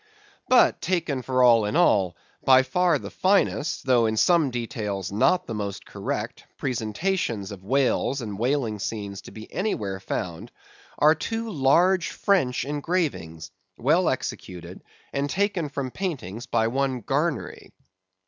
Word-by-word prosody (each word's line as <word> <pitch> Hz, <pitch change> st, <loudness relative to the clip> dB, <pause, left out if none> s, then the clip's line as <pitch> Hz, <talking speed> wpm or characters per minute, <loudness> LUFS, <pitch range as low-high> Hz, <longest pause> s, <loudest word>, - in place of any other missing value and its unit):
But, 255 Hz, -1 st, +5 dB
taken 165 Hz, -7 st, -1 dB
for 130 Hz, 0 st, +1 dB
all 115 Hz, -3 st, +6 dB
in 105 Hz, -, -2 dB
all, 95 Hz, -4 st, +3 dB, 0.3 s
by 130 Hz, 0 st, +6 dB
far 170 Hz, +5 st, +2 dB
the -, -, -8 dB
finest, 185 Hz, -5 st, +1 dB
though 120 Hz, -3 st, +4 dB
in 110 Hz, 0 st, -1 dB
some 165 Hz, +1 st, +4 dB
details 110 Hz, -6 st, -4 dB
not 180 Hz, -, +2 dB
the 165 Hz, -, -5 dB
most 100 Hz, -2 st, -4 dB
correct, -, -, -4 dB
presentations 115 Hz, -, -2 dB
of 95 Hz, -2 st, -9 dB
whales 135 Hz, +3 st, +1 dB
and 105 Hz, -5 st, -6 dB
whaling 120 Hz, -4 st, 0 dB
scenes 100 Hz, -1 st, -4 dB
to -, -, -12 dB
be 110 Hz, 0 st, -11 dB
anywhere 105 Hz, -, -2 dB
found, 90 Hz, +3 st, -5 dB, 0.5 s
are 150 Hz, +1 st, +6 dB
two 225 Hz, +7 st, -4 dB
large 170 Hz, +5 st, +3 dB
French 135 Hz, -12 st, +1 dB
engravings, 145 Hz, -, -2 dB, 0.3 s
well 165 Hz, +8 st, +3 dB
executed, 90 Hz, -8 st, -5 dB, 0.3 s
and 140 Hz, +1 st, -1 dB
taken 195 Hz, -4 st, 0 dB
from 140 Hz, -2 st, -4 dB
paintings 120 Hz, -, -5 dB
by 115 Hz, -1 st, +1 dB
one 130 Hz, +1 st, -1 dB
Garnery. 140 Hz, -, -2 dB
130 Hz, 140 wpm, -25 LUFS, 110-165 Hz, 0.5 s, all